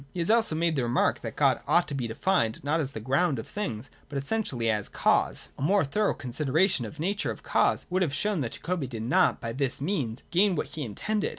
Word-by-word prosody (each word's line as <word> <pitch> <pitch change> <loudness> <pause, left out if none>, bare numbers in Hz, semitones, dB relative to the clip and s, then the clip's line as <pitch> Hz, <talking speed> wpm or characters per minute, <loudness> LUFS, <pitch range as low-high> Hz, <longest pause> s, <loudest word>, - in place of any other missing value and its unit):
He - - -3
has 170 +5 +3
also 225 -8 +4
made 165 0 +1
the 135 - +1
remark 120 -1 +1
that - - -6
God - - +3
ought - - +3
to - - -4
be 130 -4 -2
defined 115 -2 0
not 150 +4 +1
as 140 -3 -3
the - - -5
ground 135 +6 +1
of 110 - -5
things, 135 - -5 0.2
but 145 - -4
essentially 140 - -1
as 105 -2 0
cause. - - +1
A - - -6
more 185 +4 +3
thorough 210 +10 0
considera 145 +7 +1
tion 130 - 0
of 110 - -8
the 155 - -8
nature 200 +4 -1
of - - -6
cause - - +1
would 185 +1 +1
have 170 -6 +1
shown 185 +5 0
that 120 -4 -3
Jacobi 170 -5 -3
did 115 -3 -5
not 120 - +3
by 115 0 -4
this 135 0 -1
means 140 - -2
gain 190 +1 +3
what - - -2
he 155 - -6
intended. 205 - -2
145 Hz, 240 wpm, -27 LUFS, 120-185 Hz, 0.2 s, also